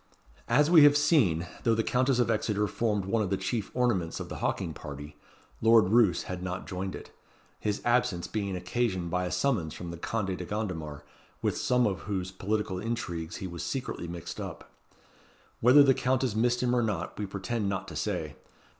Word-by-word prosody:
As 145 Hz, +7 st, +3 dB
we 165 Hz, -3 st, +9 dB
have 145 Hz, 0 st, +7 dB
seen, 130 Hz, -, +3 dB, 0.2 s
though 115 Hz, -1 st, +2 dB
the 115 Hz, -, +1 dB
Countess 130 Hz, +2 st, +2 dB
of 120 Hz, -2 st, +2 dB
Exeter 105 Hz, -1 st, 0 dB
formed 105 Hz, -2 st, -1 dB
one 110 Hz, +3 st, +1 dB
of 100 Hz, -, -1 dB
the 95 Hz, -, 0 dB
chief 110 Hz, -2 st, -2 dB
ornaments 110 Hz, -10 st, 0 dB
of -, -, -6 dB
the -, -, -6 dB
hawking -, -, -2 dB
party, 75 Hz, 0 st, -8 dB, 0.5 s
Lord 115 Hz, -4 st, +6 dB
Roos 110 Hz, -4 st, +4 dB
had 90 Hz, -1 st, -5 dB
not 90 Hz, 0 st, -4 dB
joined 95 Hz, 0 st, -4 dB
it; -, -, -10 dB, 0.5 s
his 105 Hz, -1 st, -2 dB
absence 120 Hz, -8 st, +2 dB
being 100 Hz, -3 st, -3 dB
occasioned 95 Hz, -3 st, -1 dB
by 90 Hz, +1 st, 0 dB
a 90 Hz, -, -3 dB
summons 100 Hz, -, 0 dB
from 85 Hz, -1 st, -6 dB
the 85 Hz, -, -7 dB
Conde 95 Hz, +1 st, -2 dB
de 90 Hz, -, -6 dB
Gondomar, 85 Hz, -8 st, -4 dB, 0.4 s
with -, -, +1 dB
some 125 Hz, -1 st, +2 dB
of 95 Hz, -3 st, 0 dB
whose 95 Hz, -2 st, -2 dB
political 95 Hz, 0 st, -2 dB
intrigues 90 Hz, -7 st, -4 dB
he -, -, -5 dB
was 85 Hz, -2 st, -7 dB
secretly 130 Hz, -9 st, -4 dB
mixed 85 Hz, -1 st, -6 dB
up. -, -, -8 dB, 0.9 s
Whether 130 Hz, +5 st, +7 dB
the 135 Hz, -1 st, +5 dB
Countess 130 Hz, -2 st, 0 dB
missed 120 Hz, +2 st, +2 dB
him 125 Hz, 0 st, +2 dB
or 120 Hz, -, +3 dB
not, 110 Hz, -3 st, -3 dB
we 105 Hz, -, -2 dB
pretend 100 Hz, +2 st, -2 dB
not 95 Hz, -1 st, -3 dB
to -, -, -8 dB
say. -, -, -2 dB
105 Hz, 190 wpm, -29 LUFS, 90-120 Hz, 0.9 s, we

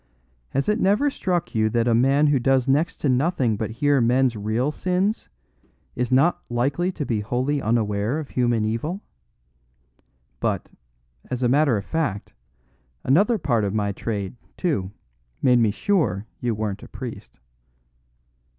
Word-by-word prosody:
"Has 135 Hz, +1 st, -1 dB
it 210 Hz, +2 st, +1 dB
never 210 Hz, +9 st, +3 dB
struck 180 Hz, -8 st, -2 dB
you 110 Hz, -2 st, +2 dB
that 115 Hz, +1 st, +1 dB
a 120 Hz, -, +3 dB
man 135 Hz, +5 st, +4 dB
who 145 Hz, -2 st, +3 dB
does 130 Hz, 0 st, +2 dB
next 150 Hz, +5 st, +1 dB
to -, -, +1 dB
nothing 130 Hz, -3 st, +1 dB
but 110 Hz, 0 st, -3 dB
hear 140 Hz, +4 st, +2 dB
men's 125 Hz, +1 st, +2 dB
real 110 Hz, +7 st, -1 dB
sins 185 Hz, +6 st, -1 dB, 0.7 s
is 125 Hz, 0 st, -2 dB
not 140 Hz, +7 st, +3 dB
likely 140 Hz, +10 st, 0 dB
to 145 Hz, -, -4 dB
be 115 Hz, -4 st, -1 dB
wholly 130 Hz, +6 st, -1 dB
unaware 110 Hz, +2 st, 0 dB
of 155 Hz, -3 st, -5 dB
human 120 Hz, -3 st, +1 dB
evil? 150 Hz, -, -3 dB, 1.4 s
But, -, -, -1 dB, 0.6 s
as 125 Hz, 0 st, -3 dB
a -, -, +4 dB
matter 135 Hz, -2 st, +3 dB
of 100 Hz, -, -5 dB
fact, 150 Hz, -11 st, -2 dB, 0.7 s
another 200 Hz, -, +3 dB
part 125 Hz, -, 0 dB
of 100 Hz, +1 st, -1 dB
my 100 Hz, -1 st, 0 dB
trade, 100 Hz, 0 st, -4 dB, 0.2 s
too, 125 Hz, -, -1 dB, 0.5 s
made 125 Hz, -2 st, +4 dB
me 115 Hz, -2 st, +3 dB
sure 110 Hz, -, 0 dB
you 120 Hz, -2 st, -1 dB
weren't 105 Hz, -2 st, -3 dB
a -, -, -10 dB
priest." -, -, -9 dB
125 Hz, 150 wpm, -23 LUFS, 110-150 Hz, 1.4 s, man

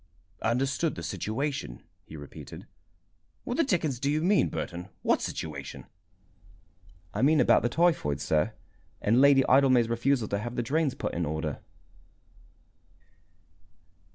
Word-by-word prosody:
"Understood 135 Hz, +6 st, 0 dB
the 85 Hz, -, -7 dB
situation," 110 Hz, -, -3 dB, 0.2 s
he 80 Hz, -, -9 dB
repeated. 70 Hz, -1 st, -10 dB, 0.8 s
"What 245 Hz, -, -3 dB
the 330 Hz, -, +4 dB
dickens 160 Hz, -, 0 dB
do 140 Hz, -, 0 dB
you 155 Hz, +2 st, 0 dB
mean, 195 Hz, +3 st, +3 dB
Burton? 90 Hz, +2 st, -5 dB
What -, -, +2 dB
situation?" 70 Hz, -4 st, -6 dB, 1.3 s
"I -, -, -2 dB
mean 150 Hz, +3 st, +4 dB
about -, -, +5 dB
the 120 Hz, -, 0 dB
typhoid, 160 Hz, -, +1 dB
sir, 80 Hz, +8 st, 0 dB, 0.5 s
and 115 Hz, +5 st, +3 dB
Lady 140 Hz, -1 st, +6 dB
Idlemay's 130 Hz, -3 st, +4 dB
refusal 120 Hz, 0 st, +1 dB
to 100 Hz, -, -1 dB
have 120 Hz, +3 st, -5 dB
the 120 Hz, -, -1 dB
drains 140 Hz, +2 st, 0 dB
put -, -, -4 dB
in 85 Hz, -, -1 dB
order." 80 Hz, -1 st, -3 dB
125 Hz, 130 wpm, -28 LUFS, 85-140 Hz, 1.3 s, Lady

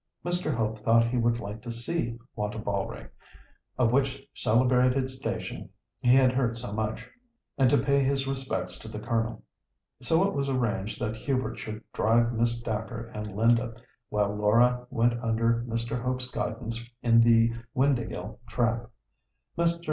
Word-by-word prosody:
Mr. 175 Hz, -2 st, +1 dB
Hope 110 Hz, -3 st, -1 dB
thought 115 Hz, +2 st, +4 dB
he 125 Hz, +2 st, -1 dB
would 115 Hz, 0 st, +2 dB
like 105 Hz, 0 st, -6 dB
to 120 Hz, -, -6 dB
see 120 Hz, +1 st, -2 dB, 0.2 s
Wantabalree, 100 Hz, -, -3 dB, 0.7 s
of 120 Hz, -3 st, +3 dB
which 135 Hz, +1 st, 0 dB
celebrated 125 Hz, +2 st, +3 dB
station 130 Hz, 0 st, -5 dB, 0.3 s
he 125 Hz, +1 st, +5 dB
had 130 Hz, -1 st, +5 dB
heard 120 Hz, -3 st, 0 dB
so 115 Hz, -3 st, -6 dB
much, 110 Hz, 0 st, -3 dB, 0.5 s
and 135 Hz, -3 st, +4 dB
to -, -, +4 dB
pay 140 Hz, +3 st, +2 dB
his 135 Hz, 0 st, +1 dB
respects 135 Hz, -1 st, -3 dB
to -, -, -10 dB
the 110 Hz, -, -6 dB
Colonel. 115 Hz, +1 st, -2 dB, 0.6 s
So 165 Hz, +9 st, +3 dB
it -, -, -3 dB
was 140 Hz, -1 st, -1 dB
arranged 115 Hz, -5 st, -1 dB
that 110 Hz, -, -1 dB
Hubert 130 Hz, +3 st, -2 dB
should 110 Hz, 0 st, -6 dB
drive 115 Hz, +1 st, +3 dB
Miss 115 Hz, +1 st, +1 dB
Dacre 115 Hz, +1 st, -4 dB
and 105 Hz, -2 st, -6 dB
Linda, 115 Hz, +1 st, +2 dB, 0.3 s
while 105 Hz, -1 st, 0 dB
Laura 120 Hz, +4 st, +3 dB
went 120 Hz, -1 st, +1 dB
under 115 Hz, +1 st, +1 dB
Mr. 115 Hz, +1 st, -2 dB
Hope's 125 Hz, 0 st, -2 dB
guidance 115 Hz, -1 st, -3 dB, 0.2 s
in 115 Hz, -1 st, +6 dB
the 115 Hz, 0 st, +5 dB, 0.2 s
Windāhgil 120 Hz, -5 st, 0 dB
trap. 115 Hz, -1 st, 0 dB, 0.7 s
Mr. 170 Hz, 0 st, +1 dB
115 Hz, 150 wpm, -28 LUFS, 110-130 Hz, 0.7 s, in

